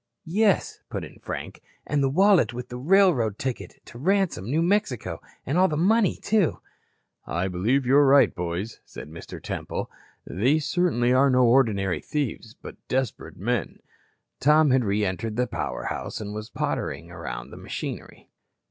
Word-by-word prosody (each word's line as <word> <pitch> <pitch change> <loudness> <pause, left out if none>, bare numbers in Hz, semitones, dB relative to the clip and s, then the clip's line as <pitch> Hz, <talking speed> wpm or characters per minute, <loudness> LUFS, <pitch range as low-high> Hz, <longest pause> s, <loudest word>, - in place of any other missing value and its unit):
"Yes," 200 +4 +1
put - - -4
in - - -14
Frank, - - -6 0.2
"and 145 0 0
the 135 - +2
wallet 175 - +4
with 125 0 -6
the 125 - -6
railroad 145 - +3
ticket 130 -2 -4
to 120 - -12
Ransome, 180 - 0
New 160 +5 +2
Mexico, 155 - 0 0.2
and 145 +7 0
all 190 - +6
that 150 - -2
money, 200 +4 +3
too." 205 -6 +2 0.7
"I 90 +2 -1
believe 110 +10 +1
you 130 +3 +4
are 145 -1 +6
right, 140 +1 +6
boys," 90 +5 -4
said 75 - -10
Mr. 80 - -9
Temple. - - -5 0.3
"These 135 - +1
certainly 125 -9 +2
are 135 +2 +5
no 130 -1 +4
ordinary 110 -7 +3
thieves, 125 -5 -4
but - - -11
desperate 130 -3 -2
men." - - -2 0.6
Tom 150 0 +5
had 130 -1 +3
re 105 0 +1
entered 105 +4 -3
the 125 +2 +1
power 70 - -4
house - - -4
and 105 -1 -6
was 110 +1 -6
pottering - - -3
around - - -7
the - - -10
machinery. - - -7
130 Hz, 165 wpm, -25 LUFS, 110-160 Hz, 0.7 s, all